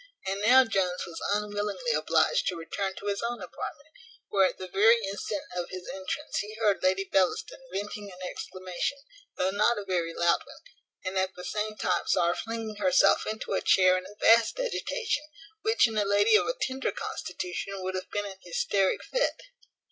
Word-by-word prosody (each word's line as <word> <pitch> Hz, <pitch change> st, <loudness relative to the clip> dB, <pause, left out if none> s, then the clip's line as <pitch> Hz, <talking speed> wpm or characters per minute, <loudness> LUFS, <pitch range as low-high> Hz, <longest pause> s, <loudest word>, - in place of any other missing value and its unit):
And 195 Hz, +1 st, -2 dB
now 255 Hz, +5 st, +7 dB
Jones 185 Hz, -5 st, 0 dB
was 165 Hz, -1 st, -8 dB
unwillingly 210 Hz, -, -1 dB
obliged -, -, +2 dB
to 180 Hz, -, 0 dB
return 190 Hz, +4 st, -3 dB
to 200 Hz, -, -9 dB
his 200 Hz, -1 st, -1 dB
own 240 Hz, +1 st, -2 dB
apartment, 255 Hz, -, -7 dB, 0.4 s
where 195 Hz, -2 st, +4 dB
at -, -, -6 dB
the 185 Hz, -, -6 dB
very 215 Hz, +6 st, +5 dB
instant 200 Hz, +8 st, -3 dB
of 175 Hz, -1 st, -3 dB
his 185 Hz, -1 st, -7 dB
entrance 295 Hz, +2 st, -4 dB
he 210 Hz, +1 st, -5 dB
heard 215 Hz, -3 st, +1 dB
Lady 190 Hz, +1 st, +2 dB
Bellaston 190 Hz, -1 st, 0 dB
venting 205 Hz, +1 st, -5 dB
an 180 Hz, -, -12 dB
exclamation, 185 Hz, +9 st, -4 dB, 0.4 s
though 185 Hz, +1 st, +1 dB
not 210 Hz, +4 st, +3 dB
a 205 Hz, -, -4 dB
very 175 Hz, -3 st, -1 dB
loud 170 Hz, 0 st, +3 dB
one; -, -, -15 dB, 0.4 s
and 190 Hz, +1 st, -1 dB
at 190 Hz, 0 st, -1 dB
the 180 Hz, -, -8 dB
same 215 Hz, +2 st, -3 dB
time -, -, 0 dB
saw 175 Hz, -2 st, +3 dB
her -, -, +2 dB
flinging 225 Hz, -2 st, -5 dB
herself 275 Hz, +6 st, +4 dB
into 215 Hz, -1 st, -3 dB
a -, -, +1 dB
chair 185 Hz, -1 st, +5 dB
in 185 Hz, 0 st, -3 dB
a 205 Hz, -, -13 dB
vast 230 Hz, -, +5 dB
agitation, 470 Hz, -8 st, -1 dB, 0.4 s
which 445 Hz, +3 st, +4 dB
in 225 Hz, -, -6 dB
a -, -, +3 dB
lady 205 Hz, +2 st, +4 dB
of -, -, +4 dB
a -, -, 0 dB
tender 265 Hz, -, -1 dB
constitution 185 Hz, +2 st, -5 dB
would 185 Hz, 0 st, -2 dB
have 185 Hz, 0 st, -4 dB
been 205 Hz, 0 st, -2 dB
an 190 Hz, -1 st, -8 dB
hysteric 200 Hz, -, 0 dB
fit. -, -, 0 dB
205 Hz, 190 wpm, -28 LUFS, 185-230 Hz, 0.4 s, now